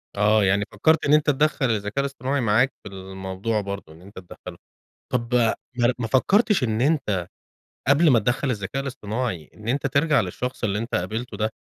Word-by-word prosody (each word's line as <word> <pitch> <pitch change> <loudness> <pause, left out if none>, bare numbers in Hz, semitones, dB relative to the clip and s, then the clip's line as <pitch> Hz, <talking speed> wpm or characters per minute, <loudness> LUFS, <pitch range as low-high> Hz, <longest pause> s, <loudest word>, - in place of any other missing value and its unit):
آه. 105 +1 +3
يعني 100 +2 +2
فكّرت 160 0 +2
إن 145 - +3
أنت 150 0 +4
تدخّل 145 -2 +2
الذكاء 105 +3 -2
الاصطناعي 140 0 -1
معاك 120 +4 +2
في - - -8
الموضوع 95 +3 -3
برضه 100 -5 -7
إن 80 - -17
أنت 100 +1 -11
تدخّله. 90 - -11 0.6
طب 120 0 -1
ما 120 +1 +1
ما 115 - -2
فكّرتش 195 - +3
إن 110 -1 -1
أنت 115 - 0 0.6
قبل 155 +4 +5
ما 120 -4 +5
تدخّل 125 +5 0
الذكاء 110 +5 -3
الاصطناعي، 115 - -4
إن 105 - -12
أنت 140 +3 0
ترجع 140 +1 +3
للشخص 125 +7 -5
اللي 105 -2 0
أنت 115 +2 -3
قابلته 110 +7 -3
ده، 110 0 0
115 Hz, 175 wpm, -24 LUFS, 100-135 Hz, 0.6 s, قبل